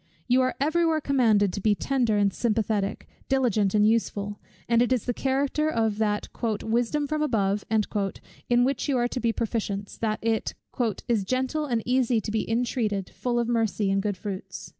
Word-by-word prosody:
You 250 +1 +4
are 255 0 0
every 315 +5 +2
where 325 -2 +2
commanded 225 -9 +3
to 200 - -4
be 210 +1 +3
tender 240 -3 +1
and 200 -1 +2
sympathetic, 215 -3 -1 0.2
diligent 225 -7 +2
and 210 0 +5
useful; 205 -2 0 0.3
and 235 0 +3
it 245 - +2
is 255 -4 +1
the 245 - 0
character 275 +4 0
of 225 -5 0
that 210 -1 0 0.4
"wisdom 240 +6 0
from 305 +1 -2
above," 205 -8 +1 0.9
in 240 0 +4
which 270 +2 0
you 270 - +2
are 240 0 +2
to 250 - -4
be 235 -2 +1
proficients, 210 -3 -3
that 215 -1 0
it 225 -1 0 0.5
"is 225 -4 +1
gentle 260 +7 -1
and 235 -4 0
easy 250 -2 +2
to 215 - -5
be 220 0 -1
intreated, 225 -4 -1
full 245 -1 -2
of 235 -1 +1
mercy 220 -4 +1
and 195 0 +2
good 205 -1 -2
fruits." 190 -2 -6
230 Hz, 180 wpm, -26 LUFS, 210-255 Hz, 0.9 s, and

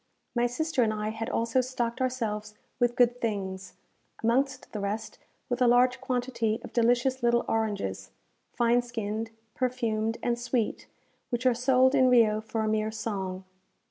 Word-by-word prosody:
My 240 0 +3
sister 310 +3 -1
and 225 -2 +3
I 215 0 -2
had 225 +1 -4
also 230 +3 +1
stocked 250 -1 -3
ourselves 215 -5 -2 0.2
with 240 -1 +2
good 245 0 +3
things; 190 -4 -3 0.5
amongst 260 +3 0
the 215 - -4
rest, 205 +2 -4 0.3
with 245 0 -2
a 250 - +5
large 250 +1 +4
quantity 245 -4 -1
of - - -10
delicious 245 +2 +2
little 235 0 +2
oranges, 210 - -2 0.4
fine 240 +1 +3
skinned, 225 -2 -4 0.2
perfumed, 230 -3 -1
and 240 0 0
sweet, 240 -2 -1 0.4
which 240 0 -2
are 255 - +5
sold 255 +2 +3
in 260 -2 +5
Rio 220 -3 +4
for 220 +1 -3
a - - 0
mere 215 0 +1
song. 195 -4 -4
235 Hz, 155 wpm, -28 LUFS, 215-250 Hz, 0.5 s, a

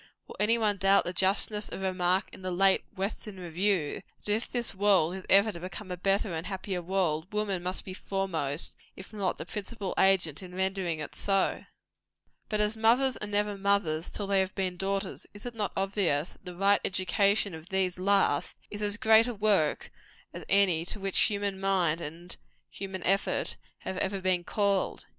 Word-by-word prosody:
Will - - -10
any 225 +3 +4
one 210 -3 +1
doubt 195 +1 +4
the 175 - -4
justness 200 +3 +2
of 195 - -6
a 190 - +1
remark 185 0 +1
in - - -11
the 185 - -3
late 190 +2 +3
"Western 195 0 -4
Review," 175 -2 -1 0.2
that 205 - +1
if 225 +3 -2
this 240 -2 -1
world 190 -4 +3
is 190 0 -8
ever 200 +3 +6
to 170 - -7
become 185 +2 -7
a - - -2
better 195 +1 0
and 160 +2 -4
a - - -5
happier 190 -1 -3
world, 175 -2 -1
woman 210 -3 -1
must 180 +1 -3
be 185 - -6
foremost, 175 -7 -2 0.2
if 190 +3 -12
not 200 -3 -1
the - - -6
principal 205 -1 -5
agent 185 -6 +3
in 180 -1 -10
rendering 190 -3 -1
it 150 - -6
so? 195 -1 0 0.8
But 215 -1 +1
as 210 +1 +1
mothers 240 +4 +3
are 210 - -4
never 205 0 0
mothers 195 -5 +1
till 205 - -4
they 195 0 +2
have 190 0 -1
been 185 -2 -1
daughters, 195 +2 -3
is 205 - -10
it 245 - -5
not 215 -3 -2
obvious 190 -6 0
that - - -22
the 180 -1 -7
right 200 +2 +3
education 195 +2 +1
of 160 +1 -10
these 185 -2 0
last 195 -6 +2
is 205 - -6
as 205 0 0
great 220 +1 +5
a 245 - -3
work 200 -7 +1 0.4
as - - -7
any 190 -5 +4
to 205 - -5
which 195 -1 +1
human 200 -2 +1
mind 180 -4 +1
and 170 +3 -6 0.3
human 190 -1 -6
effort 195 +1 0 0.3
have 190 - -5
ever 195 0 -1
been 185 -2 +1
called? 200 -2 0
195 Hz, 195 wpm, -29 LUFS, 180-205 Hz, 0.8 s, ever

